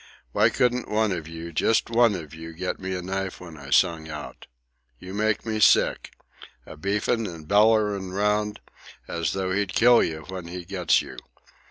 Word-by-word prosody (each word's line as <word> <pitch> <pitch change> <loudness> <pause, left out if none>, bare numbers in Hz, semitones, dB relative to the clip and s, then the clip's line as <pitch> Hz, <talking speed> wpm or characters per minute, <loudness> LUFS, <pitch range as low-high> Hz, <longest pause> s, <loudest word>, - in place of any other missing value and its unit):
Why - - +4
couldn't 125 0 0
one 110 0 +1
of 85 -4 -4
you, 80 +1 -8
just 115 +7 +1
one 115 -2 +4
of 80 -4 -8
you, 80 +1 -9
get 90 +3 -4
me 95 0 -4
a 90 - -5
knife 95 +1 -4
when 85 -3 -11
I 70 -2 -11
sung 80 0 +2
out? 75 -4 -8 0.5
You 90 +8 -10
make 110 +2 0
me 110 -1 -2
sick! - - +3 0.5
A - - -10
beefin' 105 +6 -1
and 80 -3 -9
bellerin' 105 -1 +3
'round, 105 +2 0 0.5
as 85 -1 -2
though 95 -1 -2
he'd 100 0 -1
kill 120 0 +6
you 80 -1 -2
when 95 -2 -7
he 90 0 -7
gets 90 -3 +1
you! 65 - -11
95 Hz, 180 wpm, -25 LUFS, 85-105 Hz, 0.5 s, kill